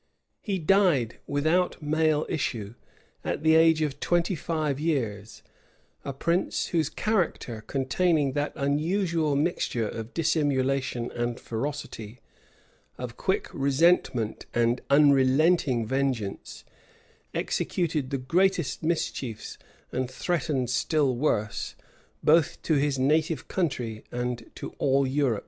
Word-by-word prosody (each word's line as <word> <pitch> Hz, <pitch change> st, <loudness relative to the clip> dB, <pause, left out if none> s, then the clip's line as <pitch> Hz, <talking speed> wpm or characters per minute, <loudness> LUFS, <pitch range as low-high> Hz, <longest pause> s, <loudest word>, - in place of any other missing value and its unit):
He 200 Hz, -4 st, -2 dB
died 165 Hz, -, +2 dB
without 155 Hz, +6 st, +1 dB
male 155 Hz, 0 st, +1 dB
issue, 115 Hz, -8 st, -3 dB, 0.5 s
at -, -, -3 dB
the 160 Hz, 0 st, +5 dB
age 160 Hz, -1 st, +5 dB
of 145 Hz, -3 st, -3 dB
twenty 175 Hz, +2 st, +1 dB
five 155 Hz, -4 st, -2 dB
years; 115 Hz, -10 st, -2 dB, 0.6 s
a 140 Hz, -, -3 dB
prince, 170 Hz, +7 st, -1 dB
whose 160 Hz, -4 st, +1 dB
character, 160 Hz, -, -1 dB
containing 145 Hz, +2 st, +1 dB
that 145 Hz, +2 st, -1 dB
unusual 160 Hz, +2 st, 0 dB
mixture 140 Hz, -7 st, 0 dB
of 115 Hz, +2 st, -7 dB
dissimulation 135 Hz, -6 st, 0 dB
and 120 Hz, 0 st, -3 dB
ferocity, 120 Hz, -3 st, -5 dB, 0.8 s
of -, -, -6 dB
quick -, -, -1 dB
resentment 135 Hz, -5 st, +1 dB
and 120 Hz, +1 st, +2 dB
unrelenting 140 Hz, -1 st, +4 dB
vengeance, 130 Hz, -5 st, -2 dB, 0.7 s
executed 155 Hz, -6 st, -1 dB
the 135 Hz, -, -1 dB
greatest 170 Hz, +4 st, +1 dB
mischiefs, 150 Hz, -8 st, -3 dB, 0.3 s
and 130 Hz, -1 st, -2 dB
threatened 135 Hz, -3 st, -1 dB
still 135 Hz, +1 st, +1 dB
worse, 110 Hz, -5 st, -1 dB, 0.5 s
both 165 Hz, +1 st, +4 dB
to 160 Hz, -, +1 dB
his 145 Hz, -1 st, +1 dB
native 155 Hz, +4 st, +1 dB
country 125 Hz, -, -2 dB
and 120 Hz, -1 st, -3 dB
to -, -, -6 dB
all 135 Hz, 0 st, +3 dB
Europe. 130 Hz, -5 st, +1 dB
145 Hz, 110 wpm, -27 LUFS, 125-160 Hz, 0.8 s, the